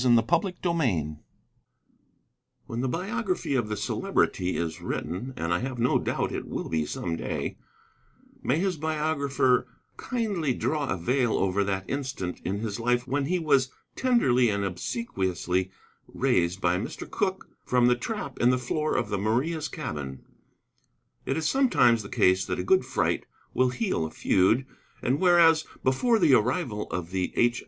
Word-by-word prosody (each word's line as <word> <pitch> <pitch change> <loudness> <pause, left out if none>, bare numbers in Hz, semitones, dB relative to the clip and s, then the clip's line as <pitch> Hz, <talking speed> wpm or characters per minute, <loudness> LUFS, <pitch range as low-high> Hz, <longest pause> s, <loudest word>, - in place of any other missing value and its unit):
CHAPTER 125 - +3 0.2
XIX 110 - 0 1.5
When 115 +1 -4
the 130 - 0
biography 190 - -2
of 120 -5 0
the 105 - -2
Celebrity 95 -2 0
is 80 -2 -3
written, 90 - -4
and 85 +1 -1
I 85 - +1
have 130 0 -4
no 120 +2 +2
doubt - - -1
it - - -4
will - - -4
be 80 -2 0
some 85 -2 -3
day, - - -4 0.8
may 130 - +1
his 185 0 0
biographer 145 -5 +1 0.3
kindly 200 - -1
draw 150 -3 -1
a 95 - 0
veil 120 +6 +1
over 95 +1 +1
that 95 -1 -2
instant 130 -10 -4
in 95 +3 -2
his 110 -1 -3
life 120 +1 +1
when 140 +1 0
he 180 +5 +1
was 140 -6 +2 0.3
tenderly 130 - +3
and 100 -1 0
obsequiously 95 - -2 0.4
raised 85 +2 +1
by 90 -1 +1
Mr. - - -6
Cooke - - -2 0.2
from 125 -1 +3
the 125 0 +5
trap 140 - -5
in 120 - +4
the 125 - +3
floor 150 +5 -1
of 115 -4 -1
the 100 -2 -1
Maria's 140 - 0
cabin. 75 - -6 1.0
It 135 - 0
is 160 -1 0
sometimes 125 - +4
the 100 - -9
case 95 +1 +3
that - - -2
a - - -2
good 380 0 +3
fright - - 0 0.3
will 130 0 +3
heal 130 - -1
a - - -9
feud. 110 +12 +2 0.4
And 130 +4 +1
whereas, 170 -3 +5 0.2
before 225 - +3
the 165 -9 +4
arrival 125 -2 +1
of 90 -1 -4
the 95 -1 -1
H. 120 0 +3
125 Hz, 160 wpm, -27 LUFS, 95-155 Hz, 1.5 s, the